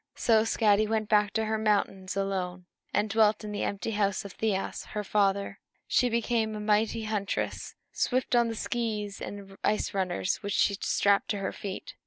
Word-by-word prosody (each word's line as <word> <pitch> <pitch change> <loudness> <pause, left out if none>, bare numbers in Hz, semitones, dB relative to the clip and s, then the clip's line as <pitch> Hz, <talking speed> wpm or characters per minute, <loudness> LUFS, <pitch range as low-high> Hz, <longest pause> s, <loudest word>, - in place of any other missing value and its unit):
So 225 -2 +4
Skadi 215 -2 +3
went 220 -1 -1
back 210 -2 +4
to 220 -1 0
her 220 0 -1
mountains 200 -3 0
alone, 185 -2 -2 0.3
and 210 +1 +1
dwelt 215 0 +3
in 210 - -5
the 205 - -3
empty 200 +2 -2
house 200 -1 0
of 200 - -8
Thiasse, 205 -3 -2
her 210 - -1
father. 200 0 +1 0.3
She 250 - +3
became 230 -1 0
a - - -4
mighty 215 +1 +1
huntress, 210 -2 -3 0.2
swift 255 -1 0
on 240 -1 +4
the 225 - -3
skees 215 -4 -3
and 195 -1 -8
ice 215 - +1
runners 185 -1 0
which 200 -1 -4
she 200 - +3
strapped 200 0 +2
to 205 - 0
her 195 - -2
feet. 195 -2 -6
210 Hz, 180 wpm, -28 LUFS, 200-220 Hz, 0.3 s, So